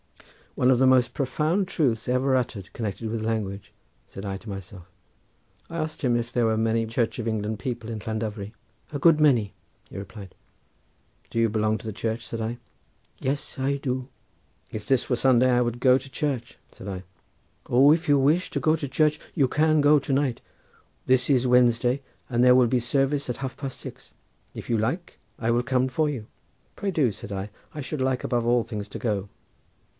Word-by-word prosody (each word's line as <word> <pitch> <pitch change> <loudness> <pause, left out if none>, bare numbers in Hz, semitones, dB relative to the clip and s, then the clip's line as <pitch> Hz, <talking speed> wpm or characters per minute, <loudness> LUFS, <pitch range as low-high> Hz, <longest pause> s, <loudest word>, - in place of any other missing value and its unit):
"One 130 0 +4
of 125 - +3
the 130 - +5
most 130 -1 +4
profound 155 +8 0
truths 125 -10 0
ever 130 +1 +2
uttered 110 -6 -2
connected 110 0 -4
with 110 0 -3
language," 105 -3 -3 0.4
said 95 - -8
I 95 -1 -3
to 110 - -11
myself. 95 -2 -8 0.9
I 165 - -5
asked 155 -1 -3
him 120 -3 +2
if 115 0 -4
there 120 -2 +2
were 110 0 +1
many 115 +1 +1
Church 115 +1 -1
of 115 - -3
England 110 -1 -2
people 120 -2 -4
in 110 -2 -4
Llandovery. 110 -2 -4 0.4
"A 145 - -3
good 155 0 +5
many," 120 -10 +3 0.4
he - - -9
replied. 100 -1 -9 1.0
"Do 115 - -2
you 115 - +4
belong 110 0 +1
to - - -13
the 110 - -4
Church?" 115 +2 -3
said 115 - -4
I. 115 +2 -3 0.6
"Yes, 140 +2 -3
I 140 +1 +1
do." 130 -1 -3 0.6
"If 110 -1 -6
this 135 -3 +2
were 125 - +3
Sunday 130 0 +4
I 125 0 +4
would 120 0 -1
go 130 0 +5
to 135 0 -9
church," 130 -4 -3
said 95 - -12
I. 95 -2 -5 0.7
"O, 135 +4 +6
if 165 -1 -2
you 145 -1 +5
wish 155 +7 +2
to - - -2
go 155 0 +3
to 150 -3 -4
church 150 +2 +2 0.2
you 140 -6 +3
can 155 +3 +3
go 145 +1 +6
to 140 - -5
night. 135 -3 +1 0.6
This 130 +1 +3
is 130 -2 +3
Wednesday, 125 +1 +3 0.3
and 120 -1 +1
there 125 0 +7
will 125 -1 +5
be 125 +1 +2
service 135 +3 0
at 125 - -2
half 130 -1 -5
past 135 -2 -6
six. - - -10 0.4
If - - -8
you 115 - +2
like 150 - -3 0.2
I 115 - -1
will 120 +1 +2
come 130 0 +1
for 150 +4 0
you." 125 -7 -4 0.5
"Pray 200 - -2
do," 145 - +2
said 100 - -9
I; 100 +1 -4 0.2
"I 150 - -7
should 145 +1 -4
like 130 -1 0
above 120 -2 0
all 120 0 +3
things 105 -3 -6
to - - -7
go." 100 -4 -2
125 Hz, 200 wpm, -25 LUFS, 110-135 Hz, 1.0 s, there